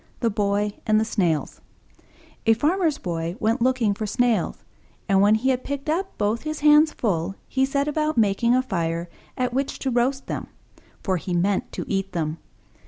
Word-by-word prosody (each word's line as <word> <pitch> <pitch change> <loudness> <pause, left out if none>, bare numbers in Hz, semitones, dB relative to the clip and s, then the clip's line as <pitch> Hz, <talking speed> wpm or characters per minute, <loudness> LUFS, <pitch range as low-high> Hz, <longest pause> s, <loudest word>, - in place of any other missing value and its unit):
THE 230 -2 +1
BOY 205 0 0
AND 215 0 +4
THE 220 - +1
SNAILS 175 -9 -1 0.9
A 225 - +6
Farmer's 315 - +1
Boy 170 -1 -3
went 225 +3 +1
looking 250 -4 +2
for 215 +1 -4
Snails, 225 -2 0 0.4
and, 195 -1 +4
when 205 +2 +5
he 245 +5 0
had 255 0 -1
picked 285 +2 -3
up 375 +4 -2
both 210 +2 0
his 310 -1 -4
hands 300 +1 +6
full, 195 - -1
he 265 0 +1
set 280 +1 0
about 305 -1 0
making 225 +3 +3
a 255 - +2
fire 170 -6 -2 0.3
at 250 -1 -1
which 270 +2 -1
to 265 - -2
roast 255 +3 +1
them; - - -4 0.6
for 185 -2 +1
he 175 +1 -3
meant 190 +3 0
to - - -4
eat 195 -1 -2
them. 160 -1 -2
225 Hz, 180 wpm, -24 LUFS, 195-265 Hz, 0.9 s, A